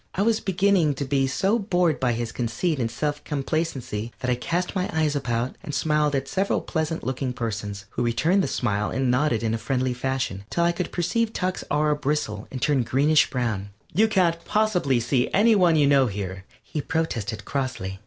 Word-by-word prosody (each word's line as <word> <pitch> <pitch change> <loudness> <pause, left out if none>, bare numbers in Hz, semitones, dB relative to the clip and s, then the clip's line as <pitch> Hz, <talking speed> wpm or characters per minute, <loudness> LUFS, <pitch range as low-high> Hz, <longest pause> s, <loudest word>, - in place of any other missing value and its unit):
I 195 - +1
was 225 0 +2
beginning 185 -5 +2
to 140 - -3
be 135 0 +1
so 195 - +1
bored 180 -6 +1
by 125 -2 +1
his 115 0 -3
conceit 125 +8 -1
and 115 -2 0
self 145 +5 -3
complacency 135 -7 -2
that 125 -1 0
I - - +4
cast 170 +9 -2
my 185 -1 -1
eyes 155 -2 +1
about 120 -2 -1
and 155 -7 -5
smiled 150 -1 +1
at 135 0 -1
several 195 +5 0
pleasant 160 0 -2
looking 130 0 -2
persons, 105 -4 -4
who - - -3
returned 155 +11 +2
the - - 0
smile 105 -4 -1
and 130 -1 0
nodded 125 -3 +1
in 110 -1 0
a 115 - -1
friendly 130 0 0
fashion, 125 -6 -2
till 170 - 0
I 170 - +4
could 175 +1 -4
perceive 225 +6 0
Tuck's 185 0 -2
aura 150 +1 +2
bristle 145 -7 -2
and 130 - -5
turn 145 -1 +2
greenish 145 +6 +3
brown. 110 -6 -2 0.2
"You 215 +7 +4
can't 175 -5 +1
possibly 180 - +1
see 120 +2 +1
any 220 +3 +5
one 180 -5 +4
you 150 -2 +4
know 140 -2 +4
here," 95 -2 -5 0.2
he 150 - -4
protested, 115 -10 -2
crossly. 110 -9 -3
140 Hz, 195 wpm, -25 LUFS, 120-170 Hz, 0.2 s, any